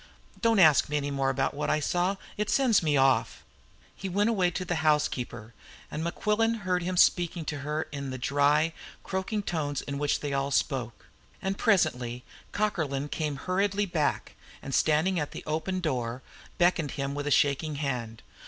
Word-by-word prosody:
Don't 230 -2 +3
ask 155 -8 +6
me 150 - 0
any 145 0 -2
more 135 -1 0
about 135 0 0
what 145 +1 -2
I 155 - +2
saw. 180 +5 0 0.2
It 210 0 -2
sends 255 -6 +4
me 150 -3 +2
off." 130 -4 +2 0.5
He 195 - -5
went 205 +5 +2
away 185 -5 +2
to 185 +1 -4
the 175 -1 -1
housekeeper, 125 -7 0 0.4
and 155 - -3
Mequillen 215 +6 0
heard 180 -2 0
him 180 +1 -2
speaking 175 -2 +3
to 145 -1 -3
her 150 +2 -2
in 140 -1 -5
the 130 - -4
dry, 145 +4 +2 0.3
croaking 190 +3 -2
tones 150 -6 -2
in 140 0 -4
which 145 0 0
they 145 -1 -3
all 135 0 0
spoke. 125 -4 -1 0.3
And 195 -1 -2
presently 125 - +1 0.3
Cockerlyne 150 -9 -1
came 150 -2 -2
hurriedly 195 +6 0
back, 170 -6 -1 0.3
and, 135 - -7
standing 160 +6 +2
at 150 - -4
the - - -7
open 160 +5 -2
door, 125 -5 -2 0.3
beckoned 175 -4 +2
to - - -7
him 140 -1 -2
with 145 0 -4
a - - 0
shaking 145 +2 +2
hand. 125 -6 -4
150 Hz, 180 wpm, -28 LUFS, 140-185 Hz, 0.5 s, ask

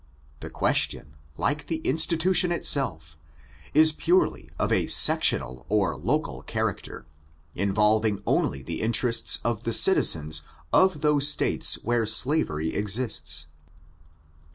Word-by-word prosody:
The - - -9
question, 75 -1 -2 0.2
like 145 +1 -3
the 165 - -2
institution 170 +4 +1
itself, 80 - -1 0.6
is 155 +1 +4
purely 175 +4 -1
of - - -2
a - - 0
sectional 65 0 +3
or 100 -3 0
local - - -3
character, - - -5 0.5
involving 105 +2 0
only 70 -1 -1
the 80 +4 -5
interests 115 +1 +1
of 115 -2 -3
the 115 - -3
citizens 80 - +3 0.3
of 185 -6 +2
those 150 -2 +2
States 145 - +2
where 120 -1 -1
slavery 80 - 0
exists. 100 - -1
115 Hz, 110 wpm, -24 LUFS, -, 0.6 s, is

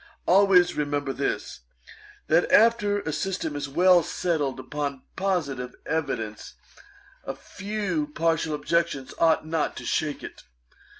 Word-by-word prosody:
Always 180 -1 +5
remember 145 -2 -1
this, 140 - -3 0.7
that - - +2
after 210 -2 +4
a 160 - -4
system 170 -2 -2
is 145 -1 -4
well 180 +4 +5
settled 150 -5 -1
upon 140 -1 -4
positive 145 -10 -2
evidence, 135 -9 -3 0.7
a - - -5
few 195 -6 -3
partial 160 0 0
objections 150 -3 -1
ought 165 -1 +3
not 160 -1 -1
to - - -8
shake 150 -2 -1
it. - - -9
160 Hz, 120 wpm, -26 LUFS, 145-180 Hz, 0.7 s, Always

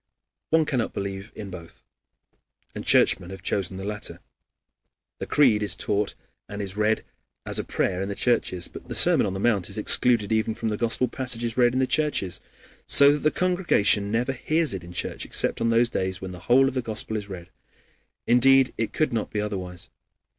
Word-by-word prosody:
One 160 0 +3
cannot 130 -6 -2
believe 100 +1 -5
in 100 -3 -8
both. 85 -2 -12 0.9
And - - -7
Churchmen 90 +1 +2
have 95 0 -10
chosen 95 -1 -2
the 95 - -6
latter. 105 0 -6 1.0
The - - -5
Creed 125 -8 +3
is 100 -3 0
taught 100 +1 -2 0.3
and 100 - -7
is 100 -2 -5
read 105 +1 0 0.4
as - - -4
a - - -2
prayer 90 0 -2
in 100 - -3
the 100 - -4
churches, 90 -7 -1
but - - -12
the - - -4
Sermon - - +5
on 95 - -4
the - - -4
Mount 100 -5 +1
is - - -7
excluded 115 -5 +3
even 110 0 0
from 110 - -3
the 105 - -2
Gospel 120 +2 +1
passages 120 -2 -2
read 120 -1 +3
in 130 - 0
the 130 - +2
churches, 145 - -1 0.5
so 140 0 +7
that 150 - 0
the 155 - +2
congregation 170 - +1
never 120 +5 0
hears 155 +3 0
it 95 -3 -6
in 85 - -11
church, - - -4
except - - +1
on 115 - +1
those 115 +1 +3
days 95 -5 -3
when 95 -1 -7
the 90 - -9
whole 135 +2 +5
of 135 - -2
the 130 - -1
Gospel 110 -1 -1
is 105 -2 -5
read. 90 -1 -9 0.7
Indeed, 130 +2 +4
it 115 - -3
could 155 -5 0
not 110 -2 -2
be 105 - -3
otherwise. 95 -4 -5
110 Hz, 200 wpm, -24 LUFS, 95-125 Hz, 1.0 s, so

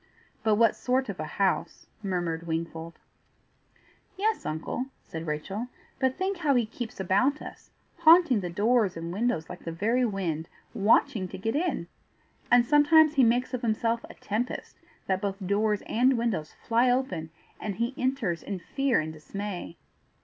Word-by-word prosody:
"But 215 -1 +3
what 225 0 +4
sort 255 -1 0
of 195 - -5
a 155 - -2
house?" 190 -4 0 0.2
murmured 175 -4 -2
Wingfold. 165 0 -4 1.2
"Yes, 435 +3 0
uncle," 160 +11 -3 0.2
said 160 0 -7
Rachel; 190 +10 -3 0.3
"but 260 -1 +1
think 380 +1 -1
how 295 -5 +2
he 240 -2 +3
keeps 225 0 -7
about 200 +10 +2
us, - - -11 0.3
haunting 330 -7 +6
the 180 -2 -4
doors 205 0 +2
and 165 +1 -5
windows 205 -6 0
like - - -9
the 165 - -4
very 225 +9 +1
wind, 180 -8 -2 0.2
watching 210 0 +3
to - - -8
get 225 +6 -2
in! 310 - 0 0.6
And 240 0 +6
sometimes 300 +2 +6
he 275 -4 +4
makes 245 +3 +2
of 250 - -2
himself 230 0 0
a - - -11
tempest, 225 +5 -4 0.3
that 190 -1 0
both 195 -1 -2
doors 210 +2 +1
and 255 +3 +3
windows 215 -10 -2
fly 235 +2 +4
open, 220 -11 0 0.3
and 210 -3 -4
he 235 +5 -1
enters 250 -11 -1
in 200 - -4
fear 270 +8 0
and 155 0 -5
dismay." 180 +2 -6
220 Hz, 160 wpm, -28 LUFS, 180-255 Hz, 1.2 s, haunting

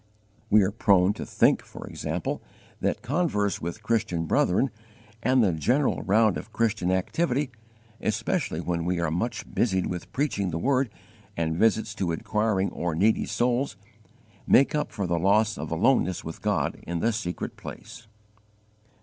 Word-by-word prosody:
We 105 0 +6
are 95 - +1
prone 100 -3 +3
to - - -7
think, - - +3
for - - -10
example, - - -3 0.4
that - - -1
converse 120 - 0
with 85 +6 -5
Christian 105 -7 0
brethren, 95 +10 +2 0.5
and 130 +1 +3
the 95 -5 +2
general 125 - +1
round 105 0 +3
of 110 - -8
Christian 110 -6 0
activity, 130 - 0 0.5
especially 110 - -1
when 85 -1 -2
we 90 +1 0
are 85 -2 0
much 115 +9 -2
busied 95 -6 +1
with 90 -1 -5
preaching 130 -9 -1
the 80 - -2
Word 130 +5 +1 0.5
and 80 -1 0
visits 110 +3 +2
to 95 -6 -1
inquiring 105 +3 0
or 85 -2 -2
needy 105 +7 +2
souls, 120 -3 0 0.7
make 135 - +5
up 150 -1 -1
for 100 - -3
the 85 -1 0
loss 105 +4 +3
of - - -5
aloneness 90 +1 +2
with 80 - -7
God - - 0
in 85 0 -4
the 115 +6 +1
secret 90 -6 -4
place. 115 - -10
105 Hz, 155 wpm, -26 LUFS, 90-115 Hz, 0.7 s, We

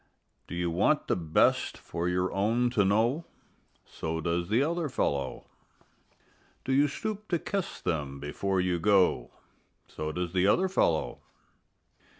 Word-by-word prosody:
Do - - -6
you 85 -1 -1
want 80 - +2
the - - +1
best 80 -3 +2
for 85 +1 -3
your 90 +1 0
own 115 +5 +1
to 110 -4 +3
know? 115 - +1 0.6
So 80 0 -4
does 85 +1 -1
the 115 +6 +3
other 165 0 -1
fellow. 70 - -2 1.2
Do 130 - 0
you 145 +2 +4
stoop 215 +7 -5
to 175 - +1
kiss 195 +2 -4
them 70 -5 -3
before 95 +7 -2
you 90 -1 0
go? 95 -10 +3 0.6
So 75 0 -5
does 90 +1 -3
the 95 0 +3
other 185 - +3
fellow. 85 - 0
95 Hz, 145 wpm, -29 LUFS, 85-130 Hz, 1.2 s, you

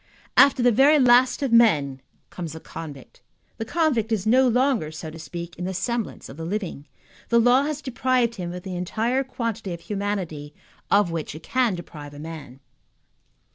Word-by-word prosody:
After 260 -3 +6
the 245 - +5
very 275 +7 +5
last 255 0 +4
of 260 -4 0
men 145 - +4 0.3
comes 170 -4 -6
the 160 - -8
convict. 150 -5 -10 0.4
The 225 - -4
convict 250 -7 0
is 210 -4 0
no 255 +4 +5
longer, 245 - +1
so 155 0 -7
to 165 - -10
speak, 170 +1 -7
in 180 - -4
the 190 0 -3
semblance 235 +4 -3
of 135 - -11
the 165 - -6
living. 175 -5 -4 0.4
The 235 - +4
law 245 +4 +4
has 300 -1 -4
deprived 255 -2 +1
him 180 -5 -5
of 180 0 -7
the 190 -2 -5
entire 225 +9 -1
quantity 230 -7 -4
of 170 - -13
humanity 190 -8 -4 0.3
of 200 -4 +3
which 160 -2 -4
it 160 - -10
can 250 -6 +1
deprive 150 -4 -10
a - - -10
man. 150 -5 -9
205 Hz, 180 wpm, -24 LUFS, 165-245 Hz, 0.4 s, After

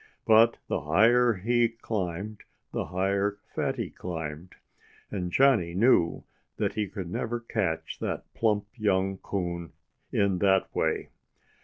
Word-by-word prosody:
But 115 +1 +6
the - - -1
higher 115 +10 +4
he 115 +4 +2
climbed, 105 -3 -4 0.3
the - - -2
higher 100 +2 0 0.2
Fatty - - -2
climbed. 80 0 -6 0.6
And 90 -4 -3
Johnnie 110 -9 +3
knew 95 -5 +3 0.3
that - - 0
he 105 -1 -1
could 95 -2 -6
never 120 +5 -2
catch 95 -9 -2
that - - -3
plump 105 -3 +1
young 95 -4 +1
coon 85 -4 -4 0.4
in 100 -3 +1
that 95 -1 +2
way. - - 0
100 Hz, 125 wpm, -28 LUFS, 90-110 Hz, 0.6 s, But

